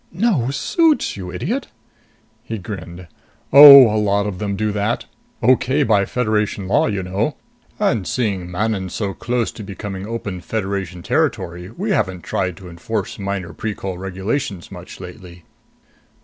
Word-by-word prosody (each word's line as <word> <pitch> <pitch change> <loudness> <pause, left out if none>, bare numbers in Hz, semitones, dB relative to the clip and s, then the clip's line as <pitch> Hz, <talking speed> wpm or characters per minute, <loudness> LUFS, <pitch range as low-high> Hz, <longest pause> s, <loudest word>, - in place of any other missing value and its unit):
"No 180 - +1
suits, 315 - +1
you 90 -2 -7
idiot!" 90 - -3 0.8
He 115 -2 -5
grinned. 90 -2 -8 0.5
"Oh, 140 -1 +12
a 105 - +2
lot 100 0 +1
of 100 -3 -4
them 100 -2 -2
do 105 +1 -1
that. 105 +2 -1 0.4
Okay 130 +4 +3
by 105 -6 +3
Federation 105 -5 -1
law, 95 - +3
you 100 -3 -2
know. 100 +10 -1 0.4
And 120 - 0
seeing 100 -8 -2
Manon's 95 0 -2
so 100 -3 -2
close 120 +1 -2
to - - -10
becoming 100 0 -6
open 105 -5 -5
Federation 95 -3 -4
territory, 90 +2 -1
we 195 - -4
haven't 95 - -1
tried 95 -3 -2
to 95 - -11
enforce 90 +8 -4
minor 95 -4 -4
Precol 95 -2 -5
regulations 95 +1 -4
much 90 -1 -10
lately." 90 -1 -11
100 Hz, 145 wpm, -20 LUFS, 95-115 Hz, 0.8 s, Oh